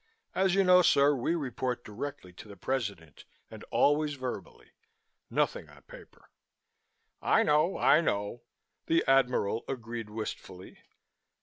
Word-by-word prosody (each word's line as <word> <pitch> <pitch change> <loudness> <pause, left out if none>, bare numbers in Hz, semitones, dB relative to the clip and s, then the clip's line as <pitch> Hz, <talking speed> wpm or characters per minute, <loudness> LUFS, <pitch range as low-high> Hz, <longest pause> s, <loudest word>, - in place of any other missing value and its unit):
As 190 -1 +2
you 195 - +4
know, 180 0 +6
sir, 145 -4 +4
we 140 +5 -1
report 130 -4 -3
directly 105 -3 -7
to 100 - -12
the 100 -1 -12
President, 100 - -4 0.3
and - - -10
always 145 0 +2
verbally. 130 -2 -7 0.6
Nothing - - -1
on - - -18
paper." - - -16 0.9
"I - - +3
know, 150 +5 +2
I 155 - +5
know," 105 -4 -2 0.5
the 165 - +2
Admiral 125 -5 +2
agreed 115 -3 -6
wistfully. 105 -4 -8
130 Hz, 125 wpm, -29 LUFS, 105-150 Hz, 0.9 s, know